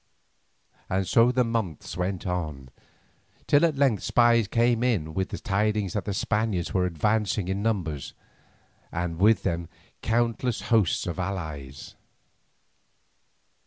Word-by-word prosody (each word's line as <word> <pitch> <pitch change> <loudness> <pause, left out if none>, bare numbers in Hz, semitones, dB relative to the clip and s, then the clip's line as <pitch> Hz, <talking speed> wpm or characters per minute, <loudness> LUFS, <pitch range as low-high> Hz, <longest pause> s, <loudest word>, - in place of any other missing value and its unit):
And 95 +1 0
so 115 +2 +5
the 125 0 +2
months 115 -12 -3
went 90 +1 -3
on, 80 -8 -4 0.8
till 145 +2 +4
at 160 -4 +2
length 135 -8 +2
spies 120 -2 +3
came 115 +1 +2
in 100 -11 0
with 95 +2 -1
the - - -5
tidings 105 -1 0
that 105 - -2
the 100 - -2
Spaniards 105 -6 -1
were 90 -1 +2
advancing 105 +3 0
in 95 +1 -2
numbers, 90 -10 -2 0.8
and 85 -1 -3
with 105 +3 +4
them 85 -3 -2 0.3
countless 115 +1 0
hosts 105 -7 +3
of 90 +1 -4
allies. 80 -8 -5
100 Hz, 125 wpm, -26 LUFS, 85-115 Hz, 0.8 s, so